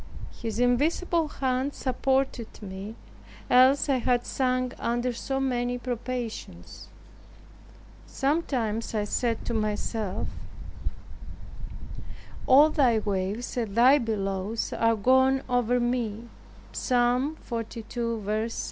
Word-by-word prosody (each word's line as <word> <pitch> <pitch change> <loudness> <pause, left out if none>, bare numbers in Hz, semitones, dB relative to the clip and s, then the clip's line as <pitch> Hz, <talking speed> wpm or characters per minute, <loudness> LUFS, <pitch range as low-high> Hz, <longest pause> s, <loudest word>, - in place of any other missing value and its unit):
His 225 -3 -3
invisible 310 +7 +2
hand 265 -1 -1
supported 265 -2 -1
me; 195 +2 -7 0.6
else 260 +4 +6
I 275 -2 +3
had 245 0 +1
sunk 255 -1 0
under 240 +1 -1
so 270 +3 -3
many 245 -2 0
probations. 240 - -6 1.2
Sometimes 250 -7 -1
I 210 - +1
said 230 +2 -1
to 235 - -2
myself, 215 -2 -2 2.2
"All 290 +4 +7
thy 255 -7 +3
waves 205 +2 -2
and 220 -4 -2
thy 255 +5 +6
billows 205 -2 -2
are 230 0 +2
gone 260 +4 +3
over 245 0 +2
me," 240 -2 -2 0.4
(Psa. 250 +3 +1
245 Hz, 95 wpm, -27 LUFS, 225-260 Hz, 2.2 s, All